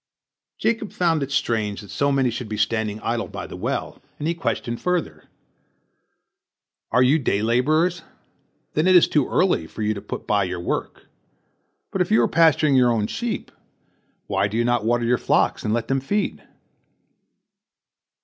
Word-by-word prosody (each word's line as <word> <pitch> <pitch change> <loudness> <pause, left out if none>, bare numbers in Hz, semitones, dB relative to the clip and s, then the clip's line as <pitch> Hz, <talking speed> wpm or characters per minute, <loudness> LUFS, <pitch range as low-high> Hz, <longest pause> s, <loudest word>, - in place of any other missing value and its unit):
Jacob 225 -2 -1
found 165 -4 +1
it 140 0 -3
strange 110 -6 -1
that 100 - -12
so 140 0 +1
many 135 -3 +2
should 115 -1 -6
be 105 - -4
standing 110 0 -1
idle 115 0 -2
by - - -7
the - - -9
well, - - -4 0.2
and 150 - -3
he 170 - +1
questioned 120 -7 -3
further: 165 - -2 1.7
"Are 125 +2 +4
you 140 +5 +4
day 105 -6 0
laborers? 155 +10 +2 0.7
then 155 +4 +1
it 185 - +6
is 175 - +7
too 150 -4 +1
early 180 - +1
for 110 - -6
you 105 +1 +1
to 100 - -7
put - - -7
by 100 -2 +2
your 90 -1 -4
work. 85 - -4 0.9
But - - -1
if - - 0
you 110 - +4
are - - +3
pasturing 155 -3 +4
your 125 -2 +5
own 110 -3 +1
sheep, 225 - -4 0.7
why 100 0 0
do 105 +3 -4
you 120 - +1
not 120 -2 +1
water 120 +1 +1
your 120 +1 +2
flocks - - +1
and 105 - -1
let 115 +1 -1
them 135 0 +1
feed?" 200 +11 -2
120 Hz, 175 wpm, -23 LUFS, 110-155 Hz, 1.7 s, is